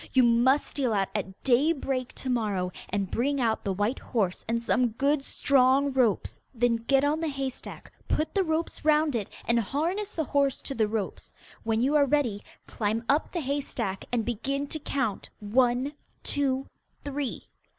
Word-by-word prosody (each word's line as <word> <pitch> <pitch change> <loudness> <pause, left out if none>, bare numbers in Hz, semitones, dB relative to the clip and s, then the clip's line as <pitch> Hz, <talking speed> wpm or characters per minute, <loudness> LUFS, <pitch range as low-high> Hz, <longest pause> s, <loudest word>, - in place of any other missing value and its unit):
You 260 - +6
must 240 +4 +4
steal 255 -5 -1
out 195 -2 +1
at 190 -2 -4
daybreak 265 -1 +1
to - - -6
morrow 205 -6 0 0.2
and 195 -1 -2
bring 280 +4 0
out 225 -3 +1
the 200 - -1
white 205 +6 0
horse 200 -7 -1
and 230 +1 +1
some 245 +1 +2
good 275 +4 +1
strong 275 +1 +3
ropes. 240 -7 +1 0.2
Then 235 0 +2
get 270 +4 +2
on 295 +2 +2
the 325 - -1
hay 275 -2 -2
stack, - - -11 0.2
put 310 - 0
the 390 - +2
ropes 320 0 -2
round 305 -2 +3
it, 210 -4 -2 0.2
and 235 0 +3
harness 340 - -1
the 320 - -1
horse 280 -1 +1
to 275 - -4
the 220 -4 +1
ropes. 210 -2 -4 0.3
When 225 0 0
you 270 +4 +2
are 290 -1 +6
ready, 250 -8 +1 0.2
climb 220 +1 -1
up 290 +3 +2
the 345 - -2
hay 285 +1 -1
stack 200 -8 -4
and 235 -3 0
begin 275 +5 -2
to 310 - -4
count 270 -8 -2
one, 245 +5 +2 0.3
two, 270 -2 0 0.4
three. 285 -2 -3
260 Hz, 180 wpm, -28 LUFS, 225-285 Hz, 0.4 s, You